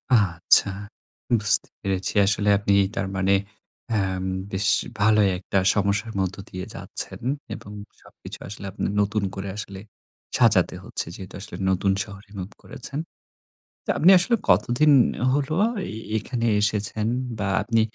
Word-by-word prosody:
আচ্ছা, 95 -1 +5 0.7
বুঝতে 105 0 +5
পেরেছি। 95 -2 -2
আসলে 105 0 +2
আপনি 100 0 0 0.2
তার 95 -1 -2
মানে 95 +1 +2 0.6
অ্যাম 95 -3 -1 0.3
বেশ 95 +1 -1 0.3
ভালোই 105 -1 +4
একটা 95 +1 -3 0.2
সমস্যার 105 +3 0
মধ্য 95 0 -1
দিয়ে 95 0 -6
যাচ্ছেন - - -2 0.4
এবং 100 - -11 0.3
সবকিছু - - -11
আসলে 100 0 -8
আপনে 105 - -4 0.2
নতুন 100 0 -1
করে 95 0 -5
আসলে 100 -2 -6 0.6
সাজাতে 105 -7 +3
হচ্ছে। - - -4
যেহেতু 95 0 -10
আসলে 95 - -8
নতুন 95 +1 +1
শহরে 100 0 -13
মুভ 95 +2 -6
করেছেন। 135 +2 -7 0.9
তো - - -12
আপনি 170 +5 +5
আসলে 235 +7 +3
কতদিন 120 +10 +3 0.4
হলো, 145 +2 0 0.4
এ - - -6 0.2
এখানে 115 +2 -3 0.2
এসেছেন 105 +1 0 0.3
বা 100 - -1 0.2
আপনি 115 -1 +1
100 Hz, 135 wpm, -23 LUFS, 95-110 Hz, 0.9 s, আচ্ছা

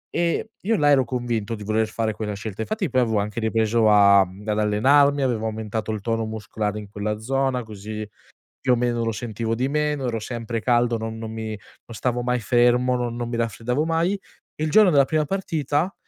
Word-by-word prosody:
E 170 +5 0
io 225 +3 +1
là, 145 -1 +3
ero 135 -3 +5
convinto 115 -3 -2
di 105 - -9
voler 110 +1 +1
fare 110 0 -1
quella 105 -1 -4
scelta. 105 +1 -6
Infatti 200 - -2
poi 130 -1 +2
avevo 110 -3 +1
anche 105 +2 -3
ripreso 110 0 +2
a 100 -1 +7
ad 105 +3 -3
allenarmi, 140 +7 +4
avevo 115 -4 0
aumentato 110 0 -3
il 105 - -4
tono 115 +1 -1
muscolare 110 -1 -4
in 105 -1 -10
quella 105 +1 -3
zona, 130 +1 0
così, 110 0 -7 0.5
più 125 -1 +3
o - - +4
meno, 120 -1 0
lo 115 - 0
sentivo 115 0 -3
di 130 +3 0
meno, 150 -2 -1
ero 115 -1 -2
sempre 115 0 -4
caldo, 120 -1 +2
non 110 0 -5
non 110 -1 -6
mi 110 -1 -5
non 110 +2 -11
stavo 125 0 -1
mai 125 0 0
fermo, 125 +1 +3
non 120 -1 -2
non 120 -1 -3
mi 120 - -3
raffreddavo 120 +6 -1
mai. 165 +4 +1 0.4
Il 155 +1 -2
giorno 215 -3 +6
della 140 -3 +6
prima 155 +2 0
partita, 165 -1 -1
115 Hz, 200 wpm, -23 LUFS, 110-130 Hz, 0.5 s, a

